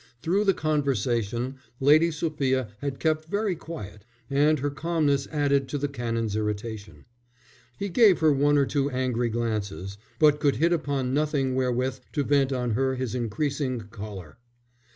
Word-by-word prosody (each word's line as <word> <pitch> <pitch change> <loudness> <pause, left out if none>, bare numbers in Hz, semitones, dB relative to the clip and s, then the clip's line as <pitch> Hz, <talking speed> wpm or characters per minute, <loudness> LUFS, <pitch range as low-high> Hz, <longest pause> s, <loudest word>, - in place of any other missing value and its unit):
Through 195 +5 +1
the 195 -2 +3
conservation 125 -4 -1 0.2
Lady 150 +5 +5
Sophia 140 -6 -1
had 140 -2 -4
kept 155 -1 0
very 200 -1 0
quiet, 105 - -9 0.3
and 150 +3 +4
her 145 +1 -2
calmness 145 -2 0
added 140 -3 +1
to 145 - -2
the 145 +1 -1
Canon's 115 -5 -2
irritation. 105 0 -4 0.7
He 200 - -3
gave 200 0 +5
her 155 -2 +4
one 145 +1 +3
or 140 - +4
two 140 0 0
angry 125 -2 -1
glances, 105 -4 -3 0.2
but 150 -1 +4
could 145 -2 +2
hit 165 +8 +2
upon 140 -5 -1
nothing 145 -3 +1
wherewith 130 0 0
to 145 - 0
vent 140 -1 +2
on 125 -2 -1
her 130 +4 +1
his 130 -3 -3
increasing 130 +2 -2
choler. 100 -3 -9
135 Hz, 150 wpm, -26 LUFS, 120-150 Hz, 0.7 s, Lady